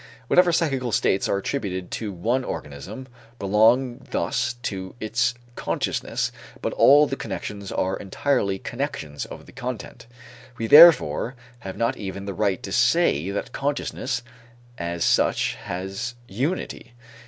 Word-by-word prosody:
Whatever 180 Hz, -1 st, +5 dB
psychical 135 Hz, -7 st, 0 dB
states 95 Hz, -2 st, +1 dB
are -, -, +2 dB
attributed 95 Hz, -5 st, -3 dB
to 110 Hz, -3 st, -3 dB
one 115 Hz, +9 st, 0 dB
organism 95 Hz, -, -7 dB, 0.3 s
belong 115 Hz, +5 st, +3 dB
thus 130 Hz, -, 0 dB
to 95 Hz, -5 st, -4 dB
its 120 Hz, +3 st, 0 dB, 0.2 s
consciousness -, -, -2 dB, 0.3 s
but -, -, -2 dB
all 145 Hz, +2 st, +7 dB
the 135 Hz, -, -3 dB
connections 100 Hz, -3 st, -6 dB
are 95 Hz, +1 st, -1 dB
entirely 100 Hz, -1 st, 0 dB
connections 95 Hz, -, -4 dB
of -, -, -10 dB
the -, -, -15 dB
content. 125 Hz, -2 st, -7 dB, 0.5 s
We, 115 Hz, -, -2 dB
therefore, 150 Hz, -2 st, +7 dB, 0.2 s
have 95 Hz, -4 st, -7 dB
not 115 Hz, +3 st, 0 dB
even 100 Hz, -1 st, -6 dB
the 100 Hz, -, -4 dB
right 95 Hz, -1 st, 0 dB
to -, -, -6 dB
say 80 Hz, +7 st, +3 dB
that 100 Hz, -, -3 dB
consciousness, 135 Hz, -3 st, -2 dB, 0.6 s
as 85 Hz, 0 st, -2 dB
such, -, -, +2 dB
has 95 Hz, +7 st, -4 dB
unity. 130 Hz, -, -3 dB
110 Hz, 130 wpm, -24 LUFS, 95-130 Hz, 0.6 s, all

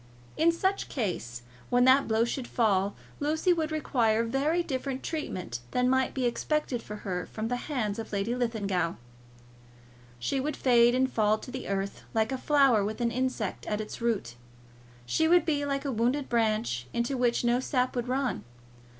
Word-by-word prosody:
In 330 Hz, +2 st, +4 dB
such 380 Hz, +4 st, -1 dB
case, 120 Hz, -, -3 dB, 0.3 s
when 245 Hz, 0 st, +4 dB
that 265 Hz, +2 st, +5 dB
blow 225 Hz, +1 st, +2 dB
should 245 Hz, +1 st, -3 dB
fall, 200 Hz, -4 st, +1 dB, 0.2 s
Lucy 315 Hz, +5 st, +2 dB
would 320 Hz, -2 st, -2 dB
require 230 Hz, -7 st, +1 dB
very 285 Hz, +9 st, +1 dB
different 265 Hz, -2 st, -3 dB
treatment 185 Hz, -, -4 dB
than 250 Hz, -, +1 dB
might 260 Hz, 0 st, +1 dB
be 260 Hz, -2 st, 0 dB
expected 255 Hz, 0 st, -1 dB
for 210 Hz, -, -8 dB
her 180 Hz, -2 st, -2 dB
from 220 Hz, +1 st, -4 dB
the 245 Hz, -, 0 dB
hands 220 Hz, -7 st, -1 dB
of 225 Hz, -, -6 dB
Lady 200 Hz, +3 st, -1 dB
Linlithgow. 200 Hz, -8 st, -1 dB, 1.2 s
She 125 Hz, -, -1 dB
would 290 Hz, +2 st, -2 dB
fade 240 Hz, -1 st, +5 dB
and 260 Hz, +1 st, +3 dB
fall 215 Hz, -1 st, +3 dB
to 250 Hz, -, -10 dB
the 260 Hz, 0 st, -6 dB
earth 195 Hz, 0 st, -3 dB
like 220 Hz, +1 st, +2 dB
a 265 Hz, -, -2 dB
flower 275 Hz, -8 st, +4 dB
with 215 Hz, +3 st, -3 dB
an 235 Hz, -1 st, +1 dB
insect 250 Hz, -4 st, -2 dB
at 210 Hz, -, -1 dB
its 215 Hz, +2 st, -6 dB
root. 215 Hz, -, -1 dB, 0.7 s
She 320 Hz, -, +2 dB
would 345 Hz, 0 st, +5 dB
be 290 Hz, -3 st, 0 dB
like 275 Hz, 0 st, -2 dB
a 280 Hz, -, 0 dB
wounded 250 Hz, +5 st, 0 dB
branch, 215 Hz, -, 0 dB
into 235 Hz, +3 st, 0 dB
which 245 Hz, -2 st, +1 dB
no 240 Hz, +1 st, +3 dB
sap 255 Hz, -1 st, 0 dB
would 245 Hz, 0 st, -2 dB
run. 260 Hz, 0 st, -1 dB
245 Hz, 175 wpm, -28 LUFS, 215-275 Hz, 1.2 s, that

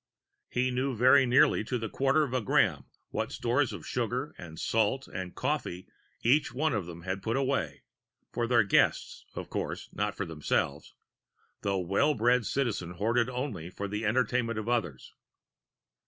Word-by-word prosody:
He 125 Hz, +1 st, 0 dB
knew 130 Hz, +1 st, -1 dB
very 130 Hz, +3 st, +6 dB
nearly 125 Hz, -3 st, +4 dB
to 125 Hz, -, -1 dB
the 115 Hz, -1 st, -3 dB
quarter 135 Hz, +7 st, +2 dB
of 135 Hz, -4 st, -4 dB
a 130 Hz, -, +1 dB
gram 105 Hz, -, +2 dB, 0.2 s
what -, -, -3 dB
stores 125 Hz, +3 st, +1 dB
of -, -, -8 dB
sugar 125 Hz, +4 st, -2 dB
and 80 Hz, -2 st, -10 dB
salt 115 Hz, +5 st, +1 dB
and 90 Hz, -1 st, -6 dB
coffee 130 Hz, -10 st, -2 dB, 0.4 s
each 140 Hz, +6 st, +3 dB
one 155 Hz, +2 st, +1 dB
of 100 Hz, -6 st, -2 dB
them 85 Hz, -1 st, -9 dB
had 95 Hz, +1 st, -3 dB
put 115 Hz, +6 st, -1 dB
away 135 Hz, 0 st, -1 dB, 0.5 s
for 120 Hz, -1 st, -1 dB
their 120 Hz, -2 st, +4 dB
guests, 100 Hz, -, +1 dB
of -, -, -6 dB
course, -, -, -4 dB
not 105 Hz, 0 st, -2 dB
for 100 Hz, -, -2 dB
themselves; 75 Hz, -3 st, -2 dB, 0.7 s
the 100 Hz, -1 st, 0 dB
well 100 Hz, -, +2 dB
bred 120 Hz, 0 st, +2 dB
Citizen 105 Hz, -10 st, -1 dB
hoarded 115 Hz, +5 st, +1 dB
only 125 Hz, -, -4 dB
for 100 Hz, +2 st, -5 dB
the 105 Hz, +2 st, -3 dB
entertainment 115 Hz, +1 st, +1 dB
of 110 Hz, 0 st, -4 dB
others. 95 Hz, -, -2 dB
115 Hz, 165 wpm, -29 LUFS, 100-130 Hz, 0.7 s, very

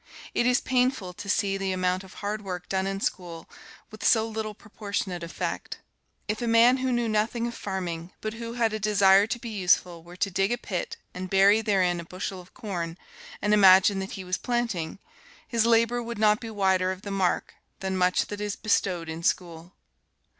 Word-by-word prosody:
It 240 Hz, -, +2 dB
is 250 Hz, 0 st, +3 dB
painful 250 Hz, -7 st, 0 dB
to 200 Hz, +3 st, -8 dB
see 195 Hz, -1 st, +1 dB
the 195 Hz, -1 st, -2 dB
amount 185 Hz, 0 st, 0 dB
of 190 Hz, -, -14 dB
hard 210 Hz, +1 st, -3 dB
work 180 Hz, -2 st, -5 dB
done 190 Hz, 0 st, -1 dB
in 195 Hz, 0 st, -3 dB
school 170 Hz, -4 st, -4 dB, 0.4 s
with 215 Hz, -, -10 dB
so 220 Hz, -1 st, +4 dB
little 220 Hz, -1 st, -4 dB
proportionate 200 Hz, -4 st, -4 dB
effect. 170 Hz, 0 st, -4 dB, 0.5 s
If 215 Hz, +2 st, -2 dB
a 240 Hz, -, -1 dB
man 230 Hz, +3 st, +6 dB
who 260 Hz, 0 st, -1 dB
knew 240 Hz, -1 st, +1 dB
nothing 220 Hz, +2 st, 0 dB
of 235 Hz, -, -3 dB
farming, 180 Hz, -5 st, -4 dB
but 215 Hz, 0 st, -4 dB
who 230 Hz, 0 st, -6 dB
had 230 Hz, -2 st, +1 dB
a 215 Hz, -, -2 dB
desire 200 Hz, -1 st, +5 dB
to 240 Hz, -, -2 dB
be 235 Hz, 0 st, -7 dB
useful, 180 Hz, -3 st, +1 dB
were 175 Hz, +2 st, -13 dB
to 195 Hz, +2 st, -1 dB
dig 195 Hz, +3 st, +1 dB
a 240 Hz, -, +1 dB
pit 460 Hz, -, -4 dB, 0.2 s
and 185 Hz, +1 st, -6 dB
bury 195 Hz, +3 st, +5 dB
therein 185 Hz, -5 st, +1 dB
a -, -, -5 dB
bushel 185 Hz, +2 st, -6 dB
of 180 Hz, -, -20 dB
corn, 175 Hz, -6 st, -4 dB, 0.5 s
and 210 Hz, 0 st, +3 dB
imagine 195 Hz, -1 st, +6 dB
that 190 Hz, 0 st, -5 dB
he 190 Hz, -, -6 dB
was 180 Hz, 0 st, -2 dB
planting, 230 Hz, -10 st, -2 dB, 0.5 s
his 230 Hz, -1 st, +1 dB
labor 230 Hz, +1 st, +3 dB
would 235 Hz, -1 st, -6 dB
not 210 Hz, 0 st, +4 dB
be 230 Hz, -, -7 dB
wider 190 Hz, -3 st, +1 dB
of 190 Hz, +1 st, -7 dB
the 200 Hz, -, -5 dB
mark 190 Hz, -3 st, 0 dB, 0.3 s
than 190 Hz, 0 st, -2 dB
much 180 Hz, 0 st, +2 dB
that 205 Hz, 0 st, -7 dB
is 210 Hz, -1 st, -2 dB
bestowed 185 Hz, -5 st, 0 dB
in 160 Hz, +1 st, -5 dB
school. 170 Hz, 0 st, -2 dB
200 Hz, 200 wpm, -26 LUFS, 185-225 Hz, 0.5 s, man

